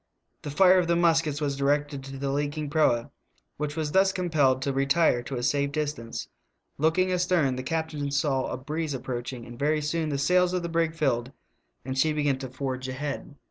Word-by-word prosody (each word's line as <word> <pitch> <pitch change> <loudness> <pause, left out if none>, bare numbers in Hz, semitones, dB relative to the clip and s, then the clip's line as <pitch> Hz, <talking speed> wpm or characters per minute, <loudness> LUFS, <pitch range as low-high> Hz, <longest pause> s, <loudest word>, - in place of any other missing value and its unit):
The - - -6
fire 185 +5 +5
of 175 - 0
the 170 - +3
muskets 165 -4 +2
was 140 -2 0
directed 140 0 0
to 135 0 -7
the 135 0 -2
leaking 145 +1 -2
proa, 120 -7 +2 0.5
which 150 0 -3
was 155 -2 -2
thus 190 +2 +4
compelled 155 -9 +2
to 140 - -1
retire 140 -1 +3
to 130 +2 -6
a 120 - -3
safe 140 +2 +1
distance; 145 -6 -3 0.5
looking 165 +5 +2
astern 180 -7 +2
the 130 - -3
cap 160 +4 -2
tain 145 -2 -3
saw 140 -2 0
a - - -4
breeze 150 +2 -3
approaching, 120 -1 -5
and 120 +1 -11
very 150 +2 +2
soon 155 +1 -1
the 140 - -1
sails 180 +5 +3
of 180 -1 -1
the 170 - -3
brig 165 -1 0
filled 130 -5 0 0.5
and 130 0 -3
she 155 +3 +3
began 145 -3 0
to 130 -1 -6
forge 130 0 -4
ahead. 140 +2 -5
145 Hz, 200 wpm, -27 LUFS, 135-160 Hz, 0.5 s, fire